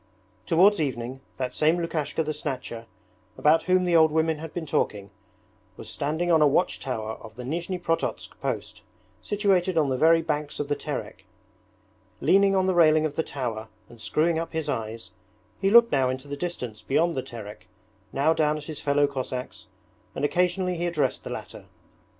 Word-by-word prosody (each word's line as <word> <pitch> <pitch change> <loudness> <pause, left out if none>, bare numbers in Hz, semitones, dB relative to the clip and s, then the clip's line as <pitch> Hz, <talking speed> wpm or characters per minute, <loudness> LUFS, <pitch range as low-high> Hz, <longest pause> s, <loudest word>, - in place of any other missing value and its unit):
Towards 185 +3 +5
evening, 130 -2 -3 0.2
that 130 -1 -3
same 160 +3 +3
Lukashka 160 -2 -1
the 155 0 -2
Snatcher, 125 -6 -5 0.5
about 155 +2 +4
whom 185 0 +4
the 175 -1 +2
old 160 -1 +6
women 160 0 +1
had 160 0 -7
been 170 -2 -5
talking, 100 -8 -1 0.7
was - - -9
standing 160 +5 -1
on 160 -2 +5
a 150 - +7
watch 145 +6 +1
tower 110 -4 -4
of 110 -1 -12
the 125 - -7
Nizhni 170 +7 -3
Prototsk 165 -2 -2
post - - -4 0.4
situated 190 -4 +1
on 150 -3 +3
the 130 -1 -1
very 165 +1 +5
banks 150 -2 -3
of 145 -1 -3
the 145 - +1
Terek. - - -6 0.9
Leaning 195 0 +4
on 190 -1 +3
the 190 - +2
railing 155 -2 +5
of 150 -2 -3
the - - +1
tower 120 -7 -4 0.2
and 120 -2 -14
screwing 155 +10 +1
up 165 0 -5
his 160 -1 -2
eyes, 115 -1 -4 0.5
he 195 - +3
looked 235 +2 +7
now 135 -2 +3
far 130 - +1
into 130 +2 -6
the 145 - -4
distance 125 -10 -5
beyond 155 +9 +1
the 130 - -1
Terek, 105 -7 -10 0.4
now 145 +4 +2
down 155 -1 +1
at 150 - -8
his 155 -2 -6
fellow 145 0 +3
Cossacks, 130 -2 -5 0.5
and - - 0
occasionally 180 +2 +1
he 175 +1 -1
addressed 150 -6 -1
the - - -7
latter. - - -8
155 Hz, 185 wpm, -26 LUFS, 130-170 Hz, 0.9 s, a